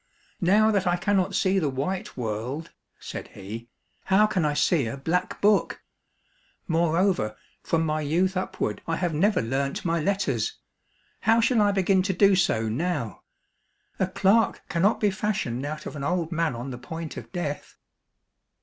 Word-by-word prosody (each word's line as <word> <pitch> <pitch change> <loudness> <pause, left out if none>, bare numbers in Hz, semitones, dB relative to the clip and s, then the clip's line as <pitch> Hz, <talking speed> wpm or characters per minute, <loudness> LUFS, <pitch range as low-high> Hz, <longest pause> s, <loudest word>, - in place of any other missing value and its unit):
" - - -36
Now 215 +1 +5
that 195 -3 +1
I 175 - +3
cannot 195 0 +1
see 190 0 +2
the 155 -5 0
white 140 +8 -3
world," 125 +7 -4 0.3
said - - -7
he, 110 +5 -8 0.2
" - - -43
how 200 +3 +6
can 190 -6 0
I 145 -1 0
see 145 -2 +2
a 115 - -4
black 175 +6 -1
book? 205 0 +2 0.8
Moreover, 165 - +1 0.3
from 165 -1 0
my 155 0 0
youth 175 +6 +1
up 185 - -3
ward 105 -1 -1
I 165 - 0
have 175 -2 -1
never 185 - +2
learnt 135 +6 -2
my 165 0 +1
letters; 155 - 0 0.6
how 225 +2 +3
shall 230 0 +3
I 205 -1 +4
begin 190 -1 +3
to 190 0 -1
djo 200 +1 +5
so 115 -11 +1
now 135 - -2 0.4
} - - -42
A 190 - +2
clerk 200 +3 +2
cannot 190 +6 +2
be 210 -2 +2
fashioned 190 - -2
out 155 +1 -6
of - - -6
an 140 - -5
old 170 +2 -1
man 165 -5 0
on 125 +3 -5
the 125 - -7
point 160 +5 -6
of - - -9
death 155 -6 -4
170 Hz, 175 wpm, -26 LUFS, 140-195 Hz, 0.8 s, how